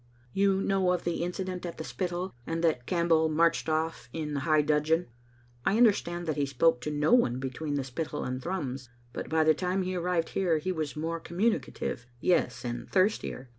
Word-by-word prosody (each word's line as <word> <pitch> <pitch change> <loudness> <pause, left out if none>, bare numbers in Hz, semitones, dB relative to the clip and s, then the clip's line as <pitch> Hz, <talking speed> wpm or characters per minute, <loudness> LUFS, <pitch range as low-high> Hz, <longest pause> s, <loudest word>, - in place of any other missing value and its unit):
" 120 0 -31
You 195 0 +3
know 190 -2 +2
of 180 - -2
the 170 0 -1
incident 180 +1 -3
at 170 -1 -5
the 160 - -5
Spittal, 180 +2 -3
and 165 +1 -2
that 140 -7 +1
Campbell 170 -2 +3
marched 165 +1 +2
off 160 -5 -1
in 150 -1 -3
high 155 +2 +3
dudgeon? 150 +3 +2 0.6
I 200 - +2
understand 185 -7 +3
that 155 -2 -2
he 140 -1 +1
spoke 140 0 +2
to 150 - -3
no 150 +7 +2
one 180 - +4
between 135 +3 -3
the 140 - 0
Spittal 135 +5 -4
and 130 +1 -3
Thrums, 135 -7 -4 0.2
but - - -5
by 160 0 +3
the 155 0 +5
time 185 +4 -1
he 185 0 -2
arrived 175 -1 0
here 175 -4 +1
he 185 +5 -2
was 155 -5 -3
more 165 +2 -2
communi 195 +5 +1
cative; 120 0 -5
yes, 175 -5 +1
and 120 0 -4
thirstier. 185 - +1
165 Hz, 200 wpm, -29 LUFS, 145-180 Hz, 0.6 s, the